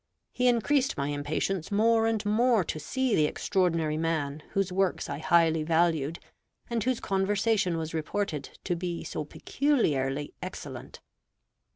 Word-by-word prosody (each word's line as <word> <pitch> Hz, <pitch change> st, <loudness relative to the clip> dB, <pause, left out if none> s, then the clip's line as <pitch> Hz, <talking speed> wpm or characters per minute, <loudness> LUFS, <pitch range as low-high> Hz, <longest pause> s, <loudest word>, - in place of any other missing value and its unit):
He 250 Hz, 0 st, +1 dB
increased 255 Hz, +3 st, +2 dB
my 140 Hz, +1 st, -1 dB
impatience 155 Hz, +5 st, -2 dB
more 225 Hz, +2 st, +3 dB
and 220 Hz, -2 st, -1 dB
more 225 Hz, 0 st, +3 dB
to 155 Hz, -, -4 dB
see 260 Hz, -, -1 dB
the 150 Hz, -, +3 dB
extraordinary 165 Hz, -4 st, 0 dB
man 155 Hz, -3 st, -1 dB
whose 195 Hz, -1 st, 0 dB
works 190 Hz, 0 st, 0 dB
I 140 Hz, -, -4 dB
highly 165 Hz, 0 st, +3 dB
valued, 160 Hz, -1 st, +1 dB, 0.5 s
and 230 Hz, -3 st, 0 dB
whose 255 Hz, -1 st, 0 dB
conversation 195 Hz, -1 st, +1 dB
was 160 Hz, 0 st, -4 dB
reported 160 Hz, -2 st, -3 dB
to 175 Hz, -, -1 dB
be 175 Hz, 0 st, -4 dB
so -, -, -4 dB
peculiarly 145 Hz, -, 0 dB
excellent. -, -, -8 dB
175 Hz, 140 wpm, -28 LUFS, 155-220 Hz, 0.5 s, more